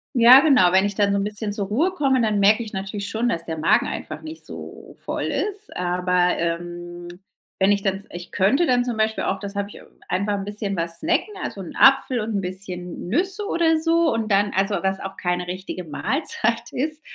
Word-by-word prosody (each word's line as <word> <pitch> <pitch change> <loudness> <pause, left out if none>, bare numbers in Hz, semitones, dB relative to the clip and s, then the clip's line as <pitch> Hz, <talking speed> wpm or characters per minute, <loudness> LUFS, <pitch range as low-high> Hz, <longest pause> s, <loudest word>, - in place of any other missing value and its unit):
Ja, 245 +2 +9
genau, 260 - +5
wenn 190 +2 +4
ich 205 - -1
dann 200 0 +2
so 200 - +1
'n 200 - 0
bisschen 210 0 -3
zur 205 -1 -2
Ruhe 300 - +1
komme, 275 -8 +1
dann 215 -2 +1
merke 210 +3 +5
ich 220 - -7
natürlich 200 +1 -5
schon, 230 +3 0
dass 170 -6 -2
der 160 -1 -4
Magen 155 +1 +3
einfach - - -6
nicht 315 +1 -9
so - - -10
voll - - -4
ist. 415 0 -3
Aber, 180 0 +1
ähm, 175 +1 -5 0.4
wenn 190 +1 +4
ich 200 -1 +2
dann 195 -1 0
s 200 - -10
ich 175 +1 -9
könnte 270 - +2
dann 245 -1 +2
zum 245 -2 -2
Beispiel 220 0 0
auch 195 - -1
das 200 0 -7
habe 200 0 -2
ich - - -12 0.3
einfach 200 +3 0
'n 200 -1 -3
bisschen 205 -1 -3
was 170 0 -3
snacken, 345 +6 0
also 195 - -5
'n 175 - -9
Apfel 270 -2 +5
und 220 0 -3
'n 200 - 0
bisschen 180 -2 -6
Nüsse 380 - 0
oder 330 -5 +2
so 330 -1 +2
und 225 -2 -2
dann 205 +1 +3
also 195 +2 +1
was 190 0 0
auch 195 0 -7
keine 180 0 -2
richtige 185 0 -5
Mahlzeit 230 - -1
ist. 305 +4 -2
205 Hz, 215 wpm, -22 LUFS, 185-245 Hz, 0.4 s, Ja